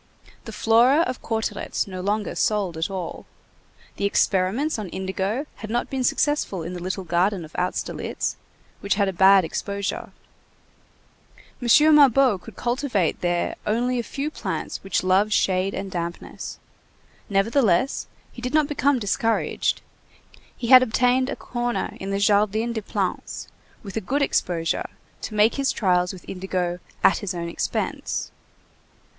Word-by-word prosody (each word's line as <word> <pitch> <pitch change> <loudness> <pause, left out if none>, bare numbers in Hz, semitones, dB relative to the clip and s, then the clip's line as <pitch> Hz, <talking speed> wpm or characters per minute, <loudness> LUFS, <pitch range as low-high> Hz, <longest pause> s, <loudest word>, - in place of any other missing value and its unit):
The - - -7
Flora 240 +7 +4
of 255 -7 -2
Cauteretz 220 -2 -2
no 185 -2 -6
longer 205 +2 -1
sold 200 -5 0
at 160 +4 -2
all. 185 -3 -6 0.7
The - - -1
experiments 200 +8 +1
on 205 -4 -5
indigo 190 - -2
had 215 - -8
not 240 +2 -1
been 265 -1 -1
successful 250 - 0
in 170 +3 -5
the 180 - -6
little 185 +2 -3
garden 175 +1 0
of 155 - -16
Austerlitz, 180 +1 -2 0.4
which 200 -1 0
had 200 -1 +2
a 195 - -1
bad 190 0 +6
exposure. 200 +4 -4 1.5
M. 300 +6 +6
Mabeuf 270 -7 +5
could - - -12
cultivate 240 - -1
there 175 -1 0
only 245 +3 +1
a - - +1
few 280 +5 -4
plants - - -4
which 195 -2 0
love 190 +3 +3
shade 190 -1 +1
and 195 0 -5
dampness. 170 -1 -5 0.7
Nevertheless, 205 +2 +2 0.2
he 240 - -10
did 250 +4 -2
not 305 -1 +4
become 285 -1 +2
discouraged. 225 +1 0 0.8
He 235 - -4
had 255 -1 +10
obtained 255 +2 +2
a - - -2
corner 240 -1 -3
in 195 - -5
the 195 - 0
Jardin 210 +3 +2
des 220 - -3
Plantes, 195 -3 -3 0.3
with 200 -3 -8
a 220 - -1
good 280 +9 0
exposure, 165 -10 0 0.3
to 215 - -5
make 210 +4 +4
his 275 -1 +1
trials 180 -3 +1
with 185 -3 -12
indigo 180 -2 -2 0.2
"at 180 - +5
his 190 -2 -4
own 170 -1 -3
expense." - - -3
205 Hz, 150 wpm, -24 LUFS, 185-245 Hz, 1.5 s, had